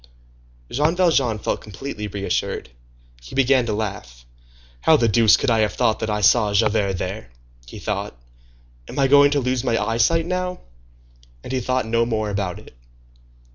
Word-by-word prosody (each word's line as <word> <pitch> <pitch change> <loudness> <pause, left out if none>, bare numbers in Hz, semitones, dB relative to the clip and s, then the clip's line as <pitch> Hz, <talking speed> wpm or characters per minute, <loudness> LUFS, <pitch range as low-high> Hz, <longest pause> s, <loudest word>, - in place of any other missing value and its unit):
Jean 150 +6 +1
Valjean 145 -11 +2
felt - - -3
completely 105 0 -7
reassured. 100 -8 -3 0.5
He - - -11
began 130 -2 +3
to 110 - -1
laugh. 100 - -5 0.5
"How 155 - +4
the 115 - +2
deuce 110 0 +5
could 130 - 0
I 115 - +2
have 110 -1 +1
thought 115 -3 +1
that 110 - -3
I 105 0 -1
saw 105 0 +3
Javert 105 -2 +2
there?" 90 - -5 0.4
he - - -10
thought. - - -4 0.7
"Am - - -9
I 135 -1 +3
going 145 +1 +6
to 145 0 +1
lose 125 -1 -1
my 115 -2 +1
eyesight 115 +10 +1
now?" 180 0 -3 0.8
And - - -6
he 130 - 0
thought 130 0 -1
no 115 +1 +1
more 110 -3 -2
about 100 -3 -3
it. - - -15
115 Hz, 170 wpm, -21 LUFS, 105-135 Hz, 0.8 s, going